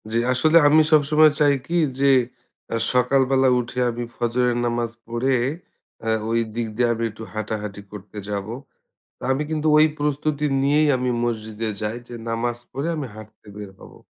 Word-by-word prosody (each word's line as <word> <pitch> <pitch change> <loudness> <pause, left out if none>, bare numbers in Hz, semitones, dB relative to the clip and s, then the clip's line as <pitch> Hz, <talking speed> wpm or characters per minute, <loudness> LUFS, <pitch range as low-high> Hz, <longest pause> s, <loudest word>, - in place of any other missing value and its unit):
জি, 115 - +1
আসলে 155 +6 +4
আমি 155 +2 +6
সবসময় 155 0 +5
চাই 145 -1 +5
কি 170 - -2 0.2
যে, 140 - +3 0.6
অ্যা 115 - -1 0.2
সকাল 125 +2 +3
বেলা 135 -1 +4
উঠে 120 +1 -4
আমি 120 +1 -5
ফজরের 120 0 0
নামাজ 120 -1 -1 0.2
পড়ে 120 +3 0 0.7
অ্যা 115 - -1 0.2
ওই 115 0 +2 0.2
দিক 120 -1 -2
দিয়ে 120 +1 +2
আমি 115 0 -4
একটু 110 +1 -10
হাঁটাহাঁটি 105 -1 -4
করতে 105 0 -11
যাবো। 100 +2 -4 0.7
তো - - -21
আমি 135 +3 -1
কিন্তু 155 0 0
ওই 155 - +7
প্রস্তুতি 150 0 -1 0.2
নিয়েই 150 +2 +3
আমি 125 0 -1
মসজিদে 110 -1 -3
যাই। 110 +1 -3
যে 120 - -9
নামাজ 115 +1 -2
পড়ে 140 +5 -3
আমি 145 -3 -3
হাঁটতে 110 0 -14
বের 105 -2 -8
হবো। - - -14
120 Hz, 170 wpm, -22 LUFS, 110-145 Hz, 0.7 s, ওই